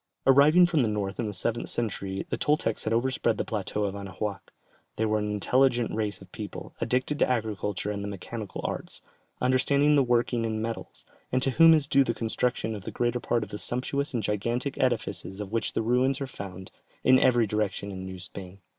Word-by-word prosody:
Arriving 145 +6 +7
from 170 -4 +2
the 120 - +2
north 100 -2 -3
in 115 - 0
the - - -2
seventh 115 +3 -2
century 100 -4 -2
the - - +2
Toltecs 145 -7 0
had 110 - 0
overspread 120 -1 +1
the - - -1
plateau 105 0 -2
of 100 -1 -1
Anahuac. 100 0 -5 0.4
They 110 - 0
were 110 0 +1
an 105 0 -2
intelligent 120 +4 +2
race 105 -3 -2
of - - -14
people, - - -7
addicted 125 +5 0
to - - +3
agriculture 105 -4 -1
and 100 -1 -4
the - - -3
mechanical 100 +2 -6
arts, - - -5 0.4
understanding 140 +3 +3
the 140 - +5
working 120 -1 +1
in 110 -1 -1
metals, 115 +1 -5 0.3
and 130 - +2
to 135 - +2
whom 165 +4 +7
is 150 -3 +1
due 140 -2 +5
the 115 -3 -2
construction 115 0 -1
of 105 -3 -7
the - - -5
greater 120 0 0
part 120 -1 0
of - - -8
the 105 - -6
sumptuous 140 +4 -2
and 120 -5 -2
gigantic 120 +7 -1
edifices 115 -5 -1
of 105 -1 -5
which 115 0 -1
the - - 0
ruins 125 +4 +2
are 140 - -2
found 95 -6 -9 0.3
in 130 0 +6
every 120 -3 +4
direction 105 -1 -2
in 95 -1 -6
New 95 0 -7
Spain. 95 +1 -9
115 Hz, 205 wpm, -27 LUFS, 105-130 Hz, 0.4 s, Arriving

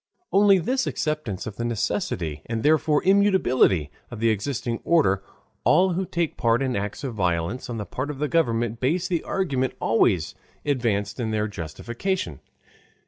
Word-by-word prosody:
On 205 +1 +4 0.2
this 260 +1 0
acceptance 150 - -2
of 110 - -7
the 115 - -3
necessity 85 -9 -2
and 115 -1 -3
therefore 150 0 +3
immutability 185 - +3 0.2
of 120 - -8
the 115 0 +3
existing 115 +2 -2
order, 145 - +3 0.4
all 185 0 +4
who 185 +2 -2
take 170 -2 -2
part 115 +2 +2
in 130 -2 -1
acts 100 +5 -4
of 130 -3 -3
violence 90 +4 -1
on 120 - -4
the 105 - -4
part 130 +9 -4
of 150 +1 -2
government 120 -8 +1
base 170 +8 +1
the 175 -3 -1
argument 135 -10 -1
always 100 -7 +2 0.3
advanced 120 -7 0
in 115 -2 -1
their 110 -1 0
justification. 105 - -4
120 Hz, 155 wpm, -24 LUFS, 105-155 Hz, 0.4 s, On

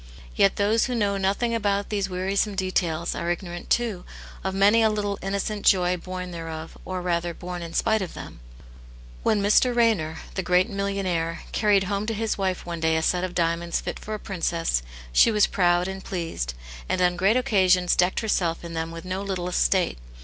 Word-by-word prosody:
Yet 195 - +4
those 210 +3 +2
who 250 - -2
know 205 -3 +1
nothing^ 200 +5 0
about 200 -2 0
these 200 -2 -1
wearisome 195 +3 -1
details, 175 -3 -1
are 170 - -3
ignorant, 175 0 -4
too, 225 -7 0 0.4
of 190 0 -2
many 205 +4 +5
a 220 - +4
little 205 -1 -2
innocent 200 +2 -2
joy 180 -1 +4
born 180 +1 -6
thereof, 165 -1 -7
or 185 -1 -4
rather, 170 -1 -1
born 180 0 -6
in 165 -1 -7
spite 220 -1 +2
of 185 - -5
them. - - -9 0.8
When 205 -2 +2
Mr. 240 +4 +4
Raynor, 200 -10 +2 0.2
the 190 - -1
greaj^ 180 +3 +2
millionaire, 195 -5 -2
carried 205 -2 +3
home 200 +2 -2
to 225 - -1
his 225 +1 -1
wife 190 -2 -2
one 170 -1 -5
day 160 0 +2
a 160 - -1
set 180 +2 +1
of' - - +1
• - - -10
Lit 180 - -14
diamonds 170 0 0
fit - - -5
for 215 - -5
a - - -7
princess^ 170 - -1 0.3
she - - +6
was 210 -2 +4
proud 175 -1 +2
ana 190 0 -5
pleased, 165 - -4 0.3
and - - 0
on 180 -1 +3
great 195 +6 +3
occasions 185 -7 +3
decked 180 +4 +2
herself 175 -7 0
in 170 - -7
them 160 0 -2
with 165 +1 -8
no 185 +1 -3
little 185 -3 -3
state. - - +1
185 Hz, 200 wpm, -25 LUFS, 175-200 Hz, 0.8 s, she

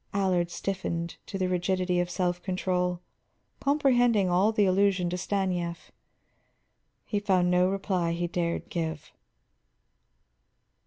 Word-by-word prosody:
Allard 185 -3 +1
stiffened 170 -3 -3
to 195 - -4
the 185 -1 0
rigidity 180 0 0
of 175 0 0
self 180 0 -1
control; 180 -2 -1 0.6
comprehending 245 -9 +3
all 190 +5 +3
the 210 -2 +2
allusion 185 -2 +2
to - - -1
Stanief, 180 -3 -2 1.1
he 205 - -1
found 185 -3 +2
no 180 +1 +4
reply 190 -3 -1
he 175 +1 -1
dared 170 -1 -2
give. 160 -3 -4
180 Hz, 115 wpm, -28 LUFS, 175-195 Hz, 1.1 s, no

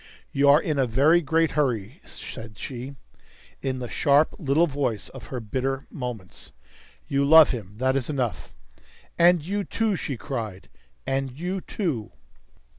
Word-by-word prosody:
"You 140 +1 +3
are 145 +2 +8
in 150 -4 -1
a 130 - +3
very 145 +9 +4
great 165 +1 +2
hurry," 130 - -1
said 110 -3 -8
she, 130 +2 -6 0.7
in 130 -1 -2
the 125 -1 -5
sharp 145 +4 +3
little 155 +1 +3
voice 135 -8 -2
of 120 -5 -11
her 125 - -4
bitter 130 +4 -2
moments. 120 -8 -7 0.5
"You 140 0 +1
love 160 +2 +8
him; 105 -6 -6
that 130 +2 +1
is 135 0 -1
enough." 130 -6 -2 0.7
"And 170 -2 +5
you, 200 +3 -1
too!" 220 0 0
she 140 -6 -4
cried. 110 -8 -5 0.4
"And 135 0 -1
you, 180 +2 -2
too!" 155 - -3
135 Hz, 150 wpm, -25 LUFS, 125-155 Hz, 0.7 s, are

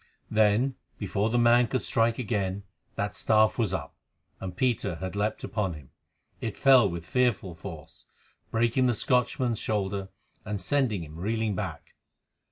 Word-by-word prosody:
Then, 110 +5 +3 0.2
before 100 +1 -1
the 120 - +1
man 120 0 +5
could 130 +2 -1
strike 115 0 +2
again, 100 -4 -2 0.3
that 100 0 -2
staff 110 +2 +3
was 110 -6 +1
up, 95 - -4 0.5
and 90 -2 -6
Peter 115 -8 0
had 95 +3 -5
leapt 105 +2 -1
upon 95 -6 -2
him. 75 -4 -13 0.5
It 110 - -4
fell 130 -6 +6
with 85 -1 -6
fearful 120 -5 +1
force, 80 -3 -10 0.4
breaking 120 +3 +2
the 120 - +2
Scotchman's 125 0 +1
shoulder 100 -2 -2 0.3
and 105 -2 -3
sending 125 - 0
him 75 0 -10
reeling 110 +2 -1
back. 90 -5 -5
105 Hz, 150 wpm, -28 LUFS, 95-120 Hz, 0.5 s, fell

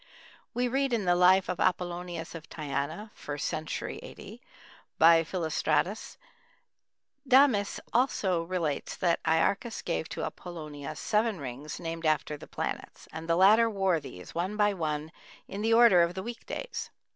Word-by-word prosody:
We 245 +1 +1
read 270 +1 0
in 220 -4 0
the 175 - +4
life 185 +2 +5
of 180 - -3
Apollonius 175 -2 -2
of 165 -2 -9
Tyana 155 +7 -4
(first 145 -1 -4
century 155 -1 -4
A.D.) - - -11 0.6
by 165 0 +7
Philostratus: 160 +3 -1 1.1
"Damis 255 -6 +4
also 205 -8 +2
relates 165 -4 -2
that 170 -2 +1
Iarchas 165 +8 +1
gave 165 -2 -2
to - - -4
Apollonius 155 -4 -7
seven 215 -1 +1
rings 140 +2 -6
named 165 -1 -3
after 150 -1 +1
the 145 - -12
planets, - - -5
and 160 +1 -7
the 165 - +4
latter 215 +6 +6
wore 195 -5 +1
these, 90 - -10
one 185 +5 -2
by 205 -1 +3
one, 155 -3 -3 0.4
in 200 - -6
the 225 +1 +3
order 230 -7 +7
of 170 +1 +1
the 190 - -4
weekdays." 240 - -6
175 Hz, 145 wpm, -29 LUFS, 160-210 Hz, 1.1 s, by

